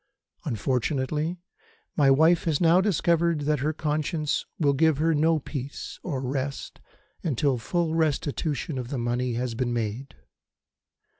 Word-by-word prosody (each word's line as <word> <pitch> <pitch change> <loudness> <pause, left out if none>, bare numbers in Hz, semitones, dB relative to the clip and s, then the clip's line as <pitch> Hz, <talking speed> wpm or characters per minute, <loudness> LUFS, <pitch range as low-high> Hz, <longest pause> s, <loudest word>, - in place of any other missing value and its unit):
Unfortunately, 135 - -1 0.6
my 140 -3 +4
wife 160 +5 +4
has 160 -4 +1
now 170 +1 +5
discovered 170 -4 +2
that 150 0 +1
her 150 +4 0
conscience 155 0 -1
will 145 -4 +2
give 160 +1 +3
her 160 +2 +2
no 160 +2 +3
peace 140 -1 -6
or 140 -7 -3
rest 135 +1 -4 0.4
until 140 -4 0
full 165 +8 -1
restitution 150 -2 -1
of 125 - -5
the 135 - -4
money 120 +1 -1
has 125 0 -2
been 120 +1 -1
made. 115 +3 -3
145 Hz, 135 wpm, -26 LUFS, 130-160 Hz, 0.6 s, now